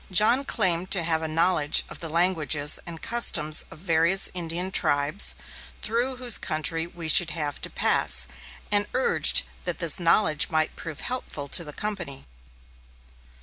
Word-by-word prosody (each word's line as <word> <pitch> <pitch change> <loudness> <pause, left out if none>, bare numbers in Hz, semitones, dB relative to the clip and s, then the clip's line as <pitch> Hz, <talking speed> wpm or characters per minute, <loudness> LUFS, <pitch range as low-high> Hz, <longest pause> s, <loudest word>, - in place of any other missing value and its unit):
John 215 +8 +3
claimed 185 -7 -1
to 185 -4 +2
have 160 -1 0
a 160 - -4
knowledge 155 -1 +1
of - - -12
the 165 - -6
languages 155 -3 0
and 165 -2 -9
customs 155 -10 +2
of - - -14
various 170 +2 +2
Indian 175 +1 -5
tribes 145 +4 +2 0.5
through 240 +4 -2
whose 245 -3 +4
country 160 +1 -2
we 170 -1 -9
should 165 +2 +5
have 150 -4 -5
to - - -4
pass, 60 -1 +2 0.4
and 205 0 +1
urged 260 - +4 0.2
that 175 -2 -4
this 170 -2 +3
knowledge 165 -3 +2
might 155 -1 -1
prove 165 -4 -9
helpful 245 - -5
to 170 - +1
the 150 - -10
company. 175 -7 -6
170 Hz, 150 wpm, -24 LUFS, 155-190 Hz, 0.5 s, should